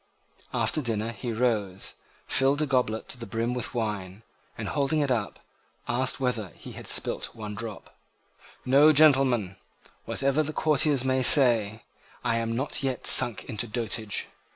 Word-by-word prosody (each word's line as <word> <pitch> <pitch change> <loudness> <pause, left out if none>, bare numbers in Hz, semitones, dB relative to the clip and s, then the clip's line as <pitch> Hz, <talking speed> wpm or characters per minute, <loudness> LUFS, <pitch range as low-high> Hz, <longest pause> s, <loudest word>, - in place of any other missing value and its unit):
After 155 - +1
dinner 115 -3 -2
he 120 +1 -6
rose, 110 -5 -1 0.3
filled 135 +2 +2
a - - +1
goblet 125 -6 -1
to 125 - -6
the 115 - -7
brim 115 +1 -2
with 125 0 -5
wine, 105 -3 -4 0.3
and, - - -5
holding 145 +2 0
it 140 -2 0
up, 110 -5 -2 0.5
asked 130 +2 -1
whether 125 -6 -2
he - - -11
had - - -9
spilt - - -1
one 105 -2 -7
drop. 105 -1 -8 0.7
"No, 140 +4 +6
gentlemen; 130 -10 +3 0.5
whatever 140 +2 0
the 155 0 -4
courtiers 150 -4 +1
may 130 0 +1
say, 115 -5 +4 0.4
I 115 - 0
am 115 0 -2
not 135 +3 -2
yet 135 -2 -3
sunk 120 - +6
into 110 +2 -4
dotage. 110 -2 -3
120 Hz, 155 wpm, -26 LUFS, 110-135 Hz, 0.7 s, No